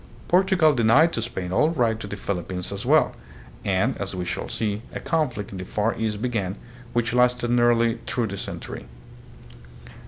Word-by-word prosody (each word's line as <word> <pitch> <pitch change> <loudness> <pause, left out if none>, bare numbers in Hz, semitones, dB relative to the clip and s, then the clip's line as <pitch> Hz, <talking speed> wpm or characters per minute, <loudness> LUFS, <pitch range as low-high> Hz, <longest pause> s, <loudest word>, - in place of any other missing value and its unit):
Portugal 180 -4 +4
denied 135 +7 +4
to 115 - -1
Spain 95 -6 -4
all 150 +11 +3
right 120 -9 +1
to 100 - -6
the 100 - -5
Philippines 90 -2 -4
as 100 +5 -5
well, 155 +3 +4 0.5
and, 100 +6 +1
as 95 -1 -3
we 90 -1 -3
shall - - -4
see, 105 -1 -2
a - - -4
conflict 130 - -1
in 95 - -6
the - - -4
Far 105 +4 0
East 110 -1 -2
began, 105 -6 -1 0.4
which 120 0 0
lasted 125 -1 +2
nearly 120 -1 +3
through 120 -1 0
the 100 -2 -4
century. - - -6
115 Hz, 175 wpm, -24 LUFS, 100-125 Hz, 0.5 s, Portugal